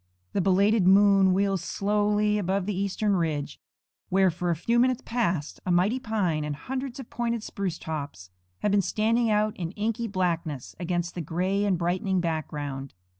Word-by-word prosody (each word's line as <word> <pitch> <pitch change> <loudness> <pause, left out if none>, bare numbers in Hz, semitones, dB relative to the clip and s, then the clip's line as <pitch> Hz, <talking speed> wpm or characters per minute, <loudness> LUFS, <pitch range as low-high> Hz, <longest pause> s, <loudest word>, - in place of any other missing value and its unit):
The 195 - +1
belated 195 +2 +3
moon 195 -1 +6
wheels 195 -1 +1
slowly 210 +1 +1
above 190 0 0
the 205 - -1
eastern 200 +1 0
ridge, 155 -5 -2 0.5
where 190 0 +4
for 175 +1 -3
a 170 - +2
few 230 +9 +1
minutes 255 0 +2
past 185 -11 -1
a - - -4
mighty 190 +8 +2
pine 200 -10 -1
and 150 -1 -3
hundreds 260 - -5
of 260 - -9
pointed 235 -2 -2
spruce 190 -6 -3
tops 140 - -6 0.3
have 210 - +1
been 200 0 +4
standing 225 +4 +1
out 210 0 +1
in 170 -3 -3
inky 225 +3 -2
blackness 170 - -2
against 175 0 -2
the 175 - -4
gray 185 +6 0
and 195 -3 +2
brightening 185 +3 0
background. 145 - -4
190 Hz, 170 wpm, -27 LUFS, 170-210 Hz, 0.5 s, moon